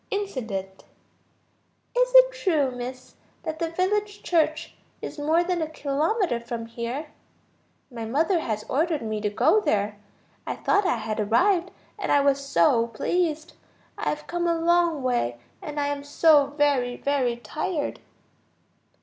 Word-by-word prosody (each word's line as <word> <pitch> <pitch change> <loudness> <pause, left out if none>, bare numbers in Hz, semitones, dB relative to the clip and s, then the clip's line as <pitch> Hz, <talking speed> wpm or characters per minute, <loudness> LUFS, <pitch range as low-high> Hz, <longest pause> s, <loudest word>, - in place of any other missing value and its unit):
Incident_. 250 - -3 1.3
"Is - - +3
it - - +9
true, 325 - +1
Miss, 250 +1 -7 0.3
that 315 -1 -4
the 335 - -1
village 410 +4 -1
church 315 -2 0 0.3
is - - -7
more 315 +4 +2
than 355 -1 -1
a 315 - -2
kilometer 310 - 0
from 235 -1 -5
here? 240 +6 -5 0.8
My 230 -2 -6
mother 320 - +1
has 215 -8 -3
ordered 310 -1 0
me 215 -1 -3
to 210 - 0
go 220 - +3
there. 205 - -1 0.5
I - - -2
thought 405 -2 +1
I 330 - +1
had 220 0 -4
arrived, 345 - +2 0.3
and - - -2
I 285 - +5
was 280 0 +2
so 230 -1 +3
pleased. 315 +7 -1 0.4
I - - -2
have 300 0 -4
come 345 0 -2
a 335 - +2
long 335 -3 +2
way, 240 - 0 0.2
and 295 0 -5
I 290 - +1
am 285 -1 -3
so 290 0 +4
very, 280 -4 +1
very 260 -4 0
tired." 300 - -3
290 Hz, 150 wpm, -25 LUFS, 240-345 Hz, 1.3 s, it